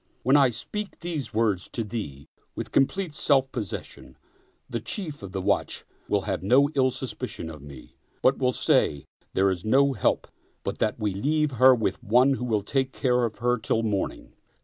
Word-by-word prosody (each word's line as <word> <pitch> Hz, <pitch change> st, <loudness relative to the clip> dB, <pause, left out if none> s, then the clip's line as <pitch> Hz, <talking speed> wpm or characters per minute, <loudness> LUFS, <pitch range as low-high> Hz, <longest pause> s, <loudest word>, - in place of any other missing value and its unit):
When 130 Hz, +4 st, +4 dB
I 140 Hz, -3 st, +6 dB
speak 200 Hz, -, -6 dB
these 160 Hz, -7 st, -4 dB
words 105 Hz, -5 st, 0 dB
to 115 Hz, -, -2 dB
thee 100 Hz, -, -6 dB, 0.3 s
with -, -, -5 dB
complete 165 Hz, +5 st, +1 dB
self 135 Hz, -3 st, +2 dB
possession, 100 Hz, -, -7 dB, 0.5 s
the -, -, -3 dB
Chief 165 Hz, -8 st, -5 dB
of 100 Hz, -2 st, -8 dB
the 95 Hz, -1 st, -3 dB
watch -, -, 0 dB, 0.2 s
will -, -, +1 dB
have -, -, -3 dB
no 135 Hz, +9 st, +4 dB
ill 130 Hz, -3 st, +3 dB
suspicion 125 Hz, -9 st, -5 dB
of 75 Hz, -3 st, -11 dB
me, 70 Hz, -1 st, -13 dB, 0.3 s
but 130 Hz, -, +4 dB
will 125 Hz, -1 st, +2 dB
say: 70 Hz, -, +1 dB, 0.3 s
There's 95 Hz, -2 st, +2 dB
no 135 Hz, +5 st, +4 dB
help 105 Hz, -, 0 dB, 0.4 s
but -, -, -4 dB
that 110 Hz, +2 st, 0 dB
we 105 Hz, -3 st, -1 dB
leave 150 Hz, +9 st, +1 dB
her 130 Hz, +1 st, +6 dB
with 100 Hz, -5 st, -2 dB
one 125 Hz, +6 st, +4 dB
who 125 Hz, -2 st, -3 dB
will 110 Hz, -4 st, 0 dB
take 130 Hz, +3 st, 0 dB
care 125 Hz, -2 st, +2 dB
of 110 Hz, -, -5 dB
her 125 Hz, -1 st, +3 dB
till 115 Hz, 0 st, 0 dB
morning. 105 Hz, -3 st, -2 dB
125 Hz, 180 wpm, -26 LUFS, 100-135 Hz, 0.5 s, I